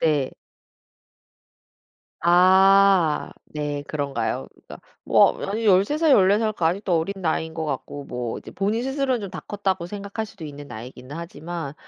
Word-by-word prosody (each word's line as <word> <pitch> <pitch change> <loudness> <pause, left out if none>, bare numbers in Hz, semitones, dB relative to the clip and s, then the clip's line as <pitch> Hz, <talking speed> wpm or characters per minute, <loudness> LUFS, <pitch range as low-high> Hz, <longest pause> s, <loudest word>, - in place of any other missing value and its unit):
네. 150 -5 +1 1.9
아. 185 -1 +5 0.2
네. 145 -1 -3
그런가요? 140 -7 -2
그러니까 - - -13 0.3
뭐 - - +5
아니 220 +3 -3
13 200 +9 +4
살, 320 -2 +3
14 200 -2 +5
살 220 -1 0
그 170 - -2
아직도 180 +1 +1
어린 165 +5 -2
나이인 160 -1 -1
것 160 -1 -3
같고 145 0 -5
뭐 125 -3 -4
이제 - - -12
본인 210 +5 -1
스스로는 265 -3 -1
좀 200 - -5
다 - - -7
컸다고 190 -4 -2
생각할 200 +3 -5
수도 210 -5 -12
있는 145 -1 -8
나이긴 125 +3 -10
하지만 165 -2 -6
175 Hz, 280 characters per minute, -23 LUFS, 150-200 Hz, 1.9 s, 아